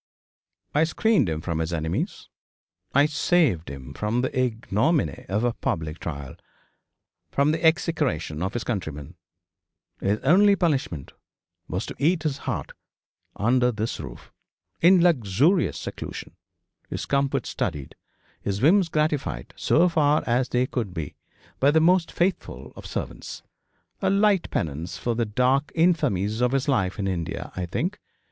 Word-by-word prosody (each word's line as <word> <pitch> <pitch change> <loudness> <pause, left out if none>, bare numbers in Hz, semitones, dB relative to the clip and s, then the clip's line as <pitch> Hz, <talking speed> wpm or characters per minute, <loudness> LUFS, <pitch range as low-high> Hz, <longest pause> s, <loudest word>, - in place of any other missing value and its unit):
I 150 - +4
screened 170 - +2
him 80 -1 -2
from 80 -1 -2
his 80 +1 -2
enemies 80 0 -3 0.6
I 140 +2 +5
saved 150 - +2
him 70 -1 -8
from 105 +7 -1
the 130 - -2
ignominy 125 - 0
of 105 +4 0
a 120 -1 +1
public 80 -5 -3
trial 70 -5 -6 0.9
from 140 +2 +2
the 160 - -2
execration 150 - +1
of 95 +4 -2
his 120 - -1
countrymen. 80 - -4 0.9
His 100 +2 +1
only 200 +8 +5
punishment 140 - -1 0.5
was - - -3
to - - -7
eat 160 +2 +2
his 145 -3 -1
heart 90 - -3 0.6
under 125 +3 +2
this 110 0 -3
roof, - - -9 0.5
in 175 +1 +6
luxurious 150 - +3
seclusion, - - -7 0.5
his - - -4
comfort 140 -1 0
studied, 70 -2 -3 0.5
his 100 0 -2
whims 170 - +4
gratified 150 - -1
so 170 +3 +3
far 155 -3 +2
as 125 +1 +1
they 125 +1 +2
could 110 -8 -4
be 80 -3 -4 0.5
by 140 - +5
the 160 +2 +4
most 175 +1 +3
faithful 180 +2 -2
of - - -9
servants. - - -6 0.6
A 190 - +2
light 200 -1 +3
penance 80 +3 -3
for 120 +6 -1
the 115 0 0
dark 130 +6 +1
infamies 115 - +2
of 125 +1 +2
his 135 0 0
life 100 -9 +1
in 100 -2 -2
India, 85 -4 -3
I 90 -1 -3
think. 175 - -2
125 Hz, 145 wpm, -25 LUFS, -, 0.9 s, in